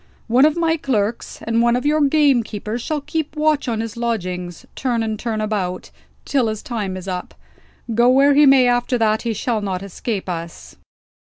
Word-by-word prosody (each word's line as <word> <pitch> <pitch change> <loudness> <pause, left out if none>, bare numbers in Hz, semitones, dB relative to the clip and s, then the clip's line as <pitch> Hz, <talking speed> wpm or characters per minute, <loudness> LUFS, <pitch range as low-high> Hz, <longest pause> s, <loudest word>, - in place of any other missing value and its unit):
One 250 +4 +4
of 310 +2 +2
my 330 -1 +1
clerks, 230 -6 -2
and 230 0 +1
one 235 0 +3
of 250 - -2
your 305 +1 +2
gamekeepers 245 -7 +1
shall 300 +4 -2
keep 310 +1 -4
watch 305 -2 +1
on 225 -2 -1
his 225 0 -5
lodgings, 180 -7 -3
turn 240 -4 -1
and 220 -1 -3
turn 225 -2 -2
about, 195 -4 -3 0.3
till 265 -5 +1
his 215 -1 -4
time 205 -6 -4
is 185 +1 -9
up. 180 -1 -5 0.6
Go 240 +2 +4
where 275 +2 +5
he 290 +1 +6
may 265 -2 +6
after 245 +1 +1
that, 220 -1 +1
he 230 -2 -2
shall 220 +1 -1
not 190 -2 -3
escape 200 +1 -4
us." 170 -2 -6
235 Hz, 185 wpm, -20 LUFS, 210-270 Hz, 0.6 s, he